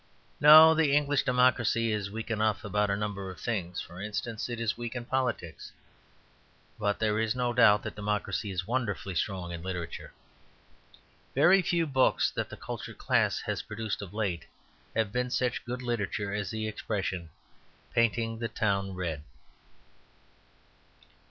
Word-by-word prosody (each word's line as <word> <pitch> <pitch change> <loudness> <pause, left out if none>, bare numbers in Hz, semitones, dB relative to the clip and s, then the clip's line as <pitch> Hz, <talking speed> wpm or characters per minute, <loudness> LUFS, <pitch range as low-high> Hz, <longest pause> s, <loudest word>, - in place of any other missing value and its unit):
No; 155 +2 +10
the 155 -3 +3
English 145 -1 +2
democracy 120 -3 +2
is 105 -2 -2
weak 110 +3 -6
enough 110 -1 0
about 105 0 +1
a 100 - +1
number 100 -2 -4
of 90 -3 -9
things; 90 -7 -3
for 85 +2 -10
instance, 110 +2 -4
it 120 -1 -4
is 115 -1 0
weak 120 0 -6
in 120 -1 -4
politics. 120 - -2 1.1
But 105 -1 0
there 110 -1 +1
is 115 +1 0
no 125 -1 0
doubt 105 -2 +5
that - - -5
democracy 105 0 -2
is 90 -2 -3
wonderfully 110 -4 -2
strong 90 0 -2
in 85 -1 -6
literature. 90 -2 -5 1.2
Very 175 +8 +6
few 175 -1 +1
books 130 -3 +2
that - - -3
the - - -9
cultured - - -7
class - - +1
has - - -3
produced 110 0 -4
of 100 -3 -8
late 100 -6 -2 0.5
have 110 -2 +1
been 125 +2 -1
such 125 -1 -1
good 125 +1 -5
literature 105 -4 -2
as 105 -3 -2
the 110 +1 -3
expression 95 -5 -3 0.6
"painting 115 -1 +1
the 115 - -1
town 100 -3 -1
red." 85 -5 -3
110 Hz, 150 wpm, -29 LUFS, 100-120 Hz, 1.2 s, No